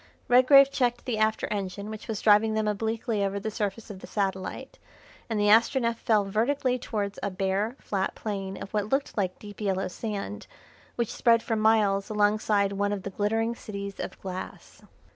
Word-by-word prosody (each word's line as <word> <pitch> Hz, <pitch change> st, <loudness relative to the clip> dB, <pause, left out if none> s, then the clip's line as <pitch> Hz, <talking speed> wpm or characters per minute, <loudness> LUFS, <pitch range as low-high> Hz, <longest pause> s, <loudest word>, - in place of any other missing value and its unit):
Redgrave 275 Hz, +3 st, +7 dB
checked 245 Hz, -3 st, 0 dB
the 235 Hz, -5 st, -2 dB
after 220 Hz, 0 st, +1 dB
engine 200 Hz, +1 st, -4 dB
which 215 Hz, -, -8 dB
was 220 Hz, -3 st, -4 dB
driving 215 Hz, +1 st, +5 dB
them 215 Hz, -1 st, 0 dB
obliquely 220 Hz, 0 st, -1 dB
over 200 Hz, 0 st, -1 dB
the 220 Hz, +2 st, -4 dB
surface 210 Hz, +1 st, -3 dB
of 190 Hz, -, -9 dB
the -, -, -10 dB
satellite, 195 Hz, -, -3 dB, 0.5 s
and 220 Hz, -2 st, -1 dB
the 205 Hz, 0 st, +3 dB
Astronef 230 Hz, +1 st, +4 dB
fell 215 Hz, -3 st, +2 dB
vertically 250 Hz, +5 st, 0 dB
towards 205 Hz, -4 st, -3 dB
a 200 Hz, -, -1 dB
bare, 195 Hz, +5 st, -1 dB
flat 195 Hz, -2 st, -2 dB
plain 195 Hz, -3 st, -4 dB
of 195 Hz, -, -8 dB
what 210 Hz, -1 st, -1 dB
looked 275 Hz, +3 st, -1 dB
like 185 Hz, -3 st, -1 dB
deep 205 Hz, 0 st, -11 dB
yellow 195 Hz, -2 st, 0 dB
sand, 185 Hz, -, -5 dB, 0.5 s
which 235 Hz, -2 st, -2 dB
spread 230 Hz, -1 st, +3 dB
for 225 Hz, -, -1 dB
miles 215 Hz, -2 st, +2 dB
alongside 210 Hz, -1 st, +2 dB
one 200 Hz, +1 st, 0 dB
of 195 Hz, -2 st, -4 dB
the 200 Hz, -, -5 dB
glittering 225 Hz, +4 st, 0 dB
cities 200 Hz, -3 st, -7 dB
of -, -, -6 dB
glass. 185 Hz, -1 st, -8 dB
210 Hz, 180 wpm, -27 LUFS, 200-225 Hz, 0.5 s, Redgrave